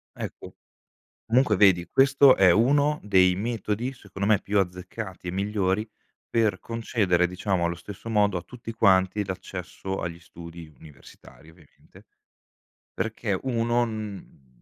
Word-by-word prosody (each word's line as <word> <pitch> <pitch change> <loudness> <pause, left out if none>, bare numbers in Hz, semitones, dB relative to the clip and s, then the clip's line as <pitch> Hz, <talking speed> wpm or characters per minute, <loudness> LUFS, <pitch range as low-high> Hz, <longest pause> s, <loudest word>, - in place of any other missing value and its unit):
Ecco. - - -8 0.7
Comunque, 115 -2 +3
vedi, 90 -4 +4
questo 135 0 +5
è 95 -2 +6
1 145 - +2
dei 95 -3 +4
metodi, 110 +3 -3
secondo 100 -6 -5
me, 110 -2 +5
più 100 +1 -1
azzeccati, 90 +1 -6
e - - -2
migliori, 100 +1 -1 0.4
per 115 -3 +1
concedere, 105 -6 0
diciamo, 90 0 -2
allo 85 0 0
stesso 95 +6 -10
modo, 105 -3 +2
a - - -8
tutti 115 +3 -9
quanti, 100 -2 +3
l'accesso 95 0 -6
agli 85 0 -5
studi 85 -2 -12
universitari, 75 +1 -16
ovviamente, 80 -3 -21 0.9
perché, 110 -3 -2
uno 120 -1 +1
n 105 - -8
100 Hz, 125 wpm, -25 LUFS, 90-115 Hz, 0.9 s, è